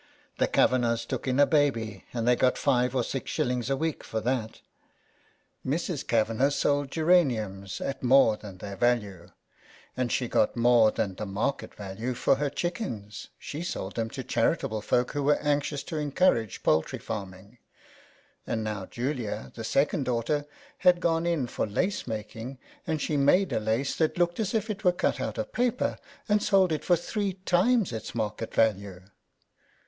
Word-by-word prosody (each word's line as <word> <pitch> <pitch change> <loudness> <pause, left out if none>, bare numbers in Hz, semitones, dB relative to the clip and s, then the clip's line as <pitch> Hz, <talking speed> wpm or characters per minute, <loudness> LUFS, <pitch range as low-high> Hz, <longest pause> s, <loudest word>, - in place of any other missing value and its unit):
The - - +3
Kavanaghs 115 -2 +2
took - - -4
in 130 +1 +1
a 145 - +8
baby 115 - 0
and 115 -1 -2
they 125 - +5
got 125 +1 +2
5s. 125 -2 +1
or 125 - +2
6s. 125 -1 -2
a 135 - +2
week 160 +1 -2
for 110 - -3
that. 115 -1 -2 1.0
Mrs. 160 +2 -2
Kavanagh 115 +4 +2
sold 145 -1 +1
geraniums 120 - +1
at 135 - -4
more 130 -3 +5
than 100 -3 -11
their 100 +2 -7
value, 100 -6 0 0.7
and 125 -2 -1
she 125 - 0
got - - +1
more 120 -2 +5
than 105 -2 -2
the 105 +3 -6
market 110 +8 -2
value 105 +5 -4
for 130 - +2
her 145 0 0
chickens 140 - -4
— - - -45
she 150 - -6
sold 100 - -4
them 115 -1 -1
to - - -6
charitable 110 -1 0
folk 125 +3 +1
who 145 - -2
were 145 +1 +3
anxious 145 -1 0
to 160 - -5
encourage 145 - +1
poultry 80 +1 +2
farming; 100 +2 -7 0.9
and 110 -1 -1
now 105 -3 -4
Julia, 120 -4 -3
the 115 - -7
second 140 +4 +1
daughter, 125 +5 -1 0.3
had 180 -1 +5
gone 165 -1 +1
in 165 -6 +1
for 120 - -2
lace 180 - -1
making, 110 +3 -6 0.3
and 160 -2 0
she 150 0 -1
made 180 +7 +3
a - - +1
lace 110 +5 -1
that 160 +1 +1
looked 175 +1 +1
as 220 +1 -1
if 220 -1 0
it 205 - -7
were 180 -2 +4
cut 180 - 0
out - - -3
of - - -4
paper, 245 0 0 0.3
and 210 0 +3
sold 190 -4 +3
it 155 - -1
for 175 - +4
three 195 +3 -2
times 195 - +3
its 110 - -6
market 110 0 -3
value. 100 -4 +1
125 Hz, 175 wpm, -27 LUFS, 110-155 Hz, 1.0 s, a